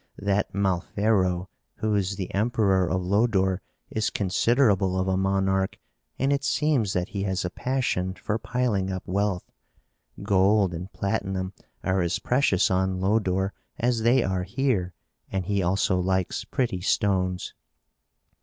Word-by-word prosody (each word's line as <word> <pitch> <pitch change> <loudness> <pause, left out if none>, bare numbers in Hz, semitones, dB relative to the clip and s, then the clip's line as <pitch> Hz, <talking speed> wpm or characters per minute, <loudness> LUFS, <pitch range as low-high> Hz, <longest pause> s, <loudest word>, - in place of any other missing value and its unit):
That 100 0 0
Malfero, 95 -1 +1 0.3
who 110 -1 -1
is 100 -1 0
the 95 -1 -5
emperor 100 -4 +2
of 95 -1 0
Lodore, 95 -1 +2 0.3
is 110 0 0
considerable 100 -1 +2
of 95 - 0
a 95 - +1
monarch, 95 0 +1 0.4
and 135 +2 +2
it 140 -1 -1
seems 140 -10 +1
that 90 0 -1
he 100 -2 -4
has 95 -2 -1
a 90 - -3
passion 120 -9 -1
for 105 +3 -2
piling 110 -6 -1
up 95 -1 -4
wealth. 95 -1 -1 0.7
Gold 100 -1 +3
and 90 +4 -6
platinum 95 -2 -2 0.3
are 95 0 +1
as 85 0 0
precious 120 -8 +2
on 95 0 +1
Lodore 95 -1 +1 0.2
as 120 -1 +1
they 120 +2 +4
are 95 -1 -1
here 95 -4 -1 0.4
and 95 -2 -2
he 100 +1 0
also 95 +1 +1
likes 95 0 -1
pretty 115 -8 -1
stones." 95 -2 0
95 Hz, 140 wpm, -26 LUFS, 95-110 Hz, 0.7 s, they